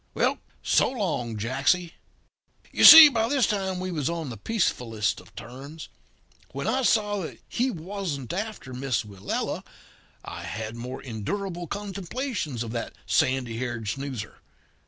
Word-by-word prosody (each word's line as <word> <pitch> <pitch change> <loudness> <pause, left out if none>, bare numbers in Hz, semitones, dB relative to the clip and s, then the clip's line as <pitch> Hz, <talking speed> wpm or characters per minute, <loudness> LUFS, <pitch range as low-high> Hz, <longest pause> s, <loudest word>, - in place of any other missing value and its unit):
Well, - - +1 0.2
so - - +3
long, 160 - -2
Jacksy.' 135 - 0 0.8
"You - - 0
see, 320 0 +13
by 230 -5 0
this 270 -4 +3
time 190 -3 -1
we 185 0 -3
were 160 -4 -2
on 165 -6 -4
the - - -6
peacefullest 120 - -1
of - - -20
terms. 135 +7 -9 0.6
When 140 - -4
I 255 +4 +1
saw 210 -4 +2
that 165 - -7
he 250 +3 0
wasn't 170 - -5
after 205 -8 -5
Miss 130 -2 -1
Willella, 100 -1 -4 0.6
I - - -7
had 110 +4 -5
more 125 +2 -7
endurable 170 - -4
contemplations 200 - -4
of 115 - -6
that 115 -1 -5
sandy 125 -3 +1
haired 120 -4 -3
snoozer. 130 -3 -5
155 Hz, 140 wpm, -26 LUFS, -, 0.8 s, see